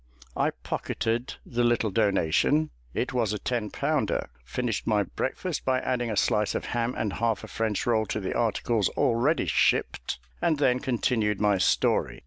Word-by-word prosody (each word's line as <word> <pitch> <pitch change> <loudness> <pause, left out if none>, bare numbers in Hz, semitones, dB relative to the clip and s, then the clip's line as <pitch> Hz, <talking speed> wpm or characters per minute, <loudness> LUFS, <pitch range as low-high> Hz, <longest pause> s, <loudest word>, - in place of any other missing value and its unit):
I - - +2
pocketed 115 +3 -3
the 120 0 -1
little 120 -3 +2
donation 105 - +2 0.2
it 125 - -2
was 115 -4 +1
a - - -1
ten 115 -1 -2
pounder; - - -1
finished 115 - -3
my 105 -2 +3
breakfast, 155 - -3
by 130 -1 +2
adding 120 -2 -1
a 105 - -2
slice 105 +1 +2
of - - -2
ham 120 +1 0
and 105 -3 -1
half 115 0 0
a - - -7
French 110 -3 -1
roll 110 -3 +2
to - - -2
the 95 - -3
articles 115 -2 +1
already 130 +7 +2
shipped, 60 - +1 0.2
and 160 -3 +2
then 125 -3 +3
continued 115 -5 0
my 105 -2 +3
story. - - +2
115 Hz, 165 wpm, -27 LUFS, 105-125 Hz, 0.2 s, my